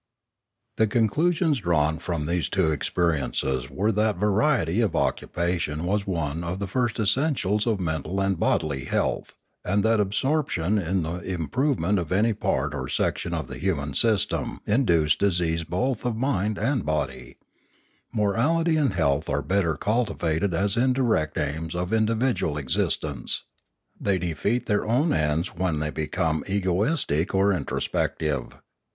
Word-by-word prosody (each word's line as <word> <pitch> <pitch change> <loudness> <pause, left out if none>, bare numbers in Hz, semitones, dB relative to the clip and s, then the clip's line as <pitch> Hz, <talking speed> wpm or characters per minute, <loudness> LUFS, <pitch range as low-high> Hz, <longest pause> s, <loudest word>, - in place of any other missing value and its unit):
The 110 - +3
conclusions 150 - +2
drawn 80 -4 +1
from 85 -3 -3
these 85 +1 -1
two 95 -5 +2
experiences 70 -5 -1
were 100 +10 0
that 105 0 +1
variety 105 - +2
of 100 -7 0
occupation 85 -3 -1
was 100 +2 0
one 80 -3 -2
of 85 +2 -3
the 100 - -3
first 120 +4 -1
es 105 -3 +3
sentials 120 -7 0
of 110 -4 +1
mental 85 +2 -2
and 95 -3 0
bodily 75 -7 0
health, - - -1 0.3
and 100 +2 +1
that 110 0 +3
absorp 135 +10 +1
tion 90 +6 0
in 90 0 0
the 85 +3 -3
improvement 95 - 0
of 85 -3 -5
any 110 +5 +3
part 70 -7 -1
or 65 -3 -4
section - - -1
of - - -3
the - - -8
human 75 -5 -1
system 110 +7 +1
induced 85 - +2
disease 85 -4 +1
both 105 +9 -1
of 120 -2 -1
mind 110 -5 0
and 125 +1 0
body; 70 -4 -3 0.8
morality 150 +11 +1
and 140 -9 +2
health 75 -4 +1
are 70 +1 0
better 85 -1 +1
cultivated 100 -4 0
as 100 +4 0
indirect 120 - +1
aims 80 +3 -2
of 90 +3 -2
individual 110 - +1
existence; 65 -4 0 0.6
they 100 -2 +1
defeat 90 +7 -1
their 105 -2 +1
own 140 +8 +2
ends 75 +4 0
when 90 -3 -1
they 75 0 -2
become 80 +1 -1
egoistic 95 - 0
or 100 +1 +4
introspective. 75 -3 -2
95 Hz, 145 wpm, -25 LUFS, 80-110 Hz, 0.8 s, or